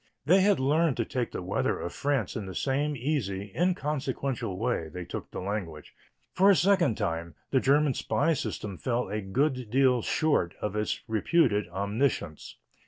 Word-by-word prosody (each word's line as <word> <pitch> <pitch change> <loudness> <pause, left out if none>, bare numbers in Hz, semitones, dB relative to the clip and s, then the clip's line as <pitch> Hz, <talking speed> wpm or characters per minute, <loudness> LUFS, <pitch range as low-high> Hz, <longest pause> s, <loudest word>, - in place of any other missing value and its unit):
They 185 +6 +5
had 200 -3 +3
learned 150 +2 +2
to 115 - 0
take 125 0 -2
the - - -5
weather - - -1
of 85 - -5
France 135 -8 -1
in 105 -4 -4
the 95 - -7
same 145 - 0
easy, 105 -8 -2
inconsequential 140 - -1
way 110 -7 -1
they 90 +1 -7
took - - -6
the - - -6
language. 90 -6 -5 0.4
For 195 +2 +5
a 200 - +7
second 175 - +3
time 85 -4 -3 0.2
the 130 - +4
German 140 +2 +3
spy 160 +5 +1
system 105 - -4
fell 125 -4 -1
a 105 +1 -2
good 125 +4 -1
deal 130 0 +3
short 145 - +1
of 105 -1 -3
its 105 0 -1
reputed 110 -1 +2
omniscience. 100 - -2
125 Hz, 170 wpm, -28 LUFS, 100-145 Hz, 0.4 s, a